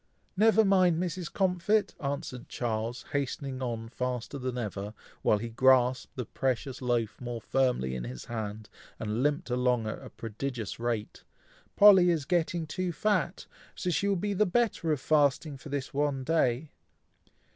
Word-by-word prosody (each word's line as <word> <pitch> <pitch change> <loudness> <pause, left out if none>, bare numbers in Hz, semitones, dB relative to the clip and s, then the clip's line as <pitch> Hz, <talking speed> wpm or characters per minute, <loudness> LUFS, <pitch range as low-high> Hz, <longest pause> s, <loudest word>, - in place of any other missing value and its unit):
"Never 220 +2 +5
mind, 185 -4 +4
Mrs. 180 -1 -3
Comfit!" 190 +2 +1
answered 140 -4 -4
Charles, 115 0 -3
hastening 135 -1 -2
on 115 -3 -3
faster 125 +3 -4
than 130 -1 -3
ever, 105 -2 -4 0.3
while 105 - +3
he 115 +3 -5
grasped 130 +1 +3
the 125 - -3
precious 130 +2 -2
loaf 120 -3 -1
more 120 -1 -4
firmly 125 - 0
in 60 -2 -4
his 60 0 -7
hand, 110 -2 -5 0.3
and 110 +2 -2
limped 150 +1 0
along 125 -2 +1
at 110 - -4
a - - -9
prodigious 115 0 -5
rate, 115 -3 -3 0.5
"Polly 190 -3 +8
is 160 -5 +1
getting 170 0 0
too 180 +4 -2
fat, 190 0 0 0.3
so 180 - -2
she 200 +4 +1
will 200 - +2
be 205 +3 -1
the 210 +2 +2
better 195 -5 +1
of 150 - +1
fasting 145 0 +2
for 140 +3 -11
this 140 -1 -3
one 140 -2 0
day." 145 -2 +1
135 Hz, 155 wpm, -29 LUFS, 120-170 Hz, 0.5 s, Polly